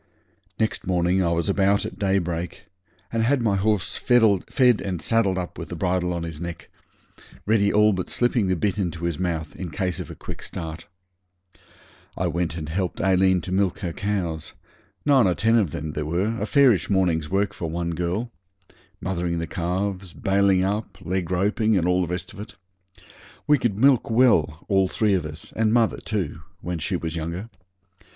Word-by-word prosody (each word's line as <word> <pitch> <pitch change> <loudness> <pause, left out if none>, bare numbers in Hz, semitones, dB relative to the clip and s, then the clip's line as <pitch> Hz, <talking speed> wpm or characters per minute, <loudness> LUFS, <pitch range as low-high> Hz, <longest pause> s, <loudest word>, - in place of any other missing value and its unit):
Next 110 -4 -1
morning 90 +1 +2
I 85 - +1
was 85 +2 0
about 100 0 +2
at - - -7
daybreak 90 -4 -1 0.5
and 115 - +1
had 130 +5 +2
my 105 -3 +2
horse 100 -1 0
fed 120 +1 +3
and 95 -3 -3
saddled 100 -2 +1
up 90 -1 -5
with - - -7
the - - -5
bridle 90 0 0
on 85 -1 -3
his 80 -1 -6
neck, 85 -2 -7 0.7
ready 100 -1 +3
all 105 0 +4
but 90 -1 -3
slipping 120 -4 +1
the 95 - +2
bit 100 +3 -1
into 85 -3 -3
his 85 -3 -2
mouth, 85 -3 -2
in 90 - -5
case 90 +1 -2
of - - -6
a - - -8
quick - - -8
start. 80 0 -6 1.3
I 95 - 0
went 85 -1 -1
and 75 -2 -5
helped 90 +3 -2
Aileen 95 -1 +3
to 90 - -7
milk 95 -1 +1
her 85 -2 -3
cows, 90 -6 -3 0.5
nine 135 -7 +5
or 90 - +1
ten 115 +2 +2
of 105 -7 +3
them 75 +2 -5
there 75 - -3
were, 95 +8 0
a 105 - -1
fairish 125 - +4
morning's 85 -6 +1
work 100 +1 0
for 85 - -4
one 85 +1 -2
girl; 90 +8 -2 0.7
mothering 85 -1 -2
the 85 - -2
calves, 90 +2 -3
bailing 95 -1 +2
up, 100 0 -2
leg 90 0 -2
roping, 105 +4 +2
and 85 -1 +1
all 90 0 +3
the 90 - -1
rest 90 +2 -5
of 105 - -12
it. 105 - -9 0.9
We 150 -2 +4
could 120 -6 0
milk 130 0 +4
well, 110 - +3
all 95 -2 +3
three 105 +2 +1
of 90 -5 0
us, 75 +1 -9
and 110 -1 +2
mother 115 -1 +3
too, 90 -8 -3 0.2
when 90 -1 -4
she - - -2
was 80 0 -3
younger. 85 +7 -5
95 Hz, 185 wpm, -24 LUFS, 85-105 Hz, 1.3 s, nine